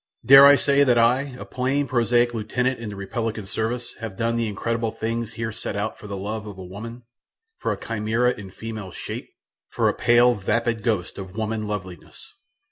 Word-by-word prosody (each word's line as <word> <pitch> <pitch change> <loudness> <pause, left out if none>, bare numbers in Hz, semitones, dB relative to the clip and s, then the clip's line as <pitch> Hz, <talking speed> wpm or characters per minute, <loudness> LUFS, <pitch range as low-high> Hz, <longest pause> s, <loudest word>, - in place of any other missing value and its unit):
Dare 135 +1 +10
I 145 - +8
say 140 0 +3
that 125 -3 +3
I, 125 +3 +2
a - - -8
plain, 135 +3 -1
prosaic 120 -1 +2
lieutenant 125 +3 -1
in 115 -2 -5
the 105 - -7
republican 110 +2 -4
service 115 +4 -3
have 110 -4 -6
done 115 0 0
the 115 -1 0
incredible 115 +2 -2
things 115 +1 -3
here 115 0 -3
set 110 -2 -5
out 105 +2 -3
for 105 - -10
the 100 -1 -5
love 105 +2 -4
of 100 -2 -9
a 95 - -8
woman 115 +6 -8 0.6
for - - -1
a - - -3
chimera 115 +2 0
in 105 -5 -8
female 110 0 -7
shape; - - -7 0.4
for - - +1
a - - 0
pale, 120 +1 +4
vapid 115 +2 -1
ghost 100 -5 -1
of 95 +1 -9
woman 110 0 -2
loveliness? 95 -5 -7
115 Hz, 195 wpm, -24 LUFS, 105-120 Hz, 0.6 s, Dare